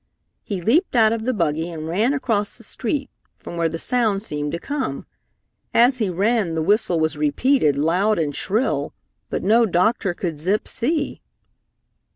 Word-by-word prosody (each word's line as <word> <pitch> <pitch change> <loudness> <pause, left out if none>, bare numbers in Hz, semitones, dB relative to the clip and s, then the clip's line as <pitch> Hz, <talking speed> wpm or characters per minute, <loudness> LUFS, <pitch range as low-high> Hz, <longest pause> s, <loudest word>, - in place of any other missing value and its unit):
He 195 -4 -4
leaped 270 - +2
out 225 -2 +5
of 225 -1 -3
the 255 - +2
buggy 165 -4 -1
and 160 -2 -6
ran 210 +10 +1
across 210 -7 0
the 230 - -8
street, 270 +5 -2 0.3
from - - -9
where 165 -1 +1
the 165 - -4
sound 215 -1 0
seemed 150 -6 -3
to - - -1
come. 280 +8 -4 0.7
As 250 +2 +5
he 215 -4 0
ran 195 -1 0
the 160 - 0
whistle 190 -2 +2
was 160 0 0
repeated 150 - +2
loud 180 +8 +2
and 150 -4 -1
shrill, 185 - -1 0.3
but - - -3
no 225 +4 +4
doctor 190 +1 +1
could 165 -5 -4
Zip 190 +7 0
see. 290 +5 -1
200 Hz, 170 wpm, -22 LUFS, 165-235 Hz, 0.7 s, out